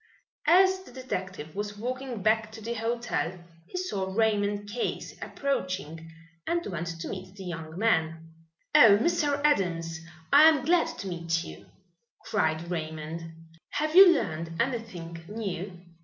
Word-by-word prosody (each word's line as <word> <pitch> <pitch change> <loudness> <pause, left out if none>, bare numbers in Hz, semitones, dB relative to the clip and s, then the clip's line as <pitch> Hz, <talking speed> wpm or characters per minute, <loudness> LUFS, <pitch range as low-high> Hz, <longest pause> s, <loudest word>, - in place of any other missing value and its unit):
As 375 +3 +6
the 375 - -14
detective 190 - -5
was 205 +1 -4
walking 250 -1 -4
back 220 0 +2
to 220 - -9
the 230 +2 -3
hotel 230 -6 -2 0.3
he 290 - -6
saw 200 - -2
Raymond 205 -1 +1
Case 230 +4 -3
approaching 185 - -3 0.4
and 340 0 0
went 170 -2 -4
to - - -4
meet 185 0 -7
the 195 - -9
young 165 -2 -6
man. 165 -7 +1 0.5
"Oh, 205 -3 +8
Mr. 295 0 +1
Adams, 170 - +1 0.3
I 295 +2 +9
am 300 -5 +1
glad 340 +1 +4
to 195 - -6
meet 170 -2 -1
you," 75 0 -11 0.6
cried 170 -5 0
Raymond. 160 0 -5 0.4
"Have 310 +2 -1
you 380 -1 +10
learned 165 - -2
anything 185 -10 -3
new?" 195 -4 -5
200 Hz, 140 wpm, -28 LUFS, 165-245 Hz, 0.6 s, you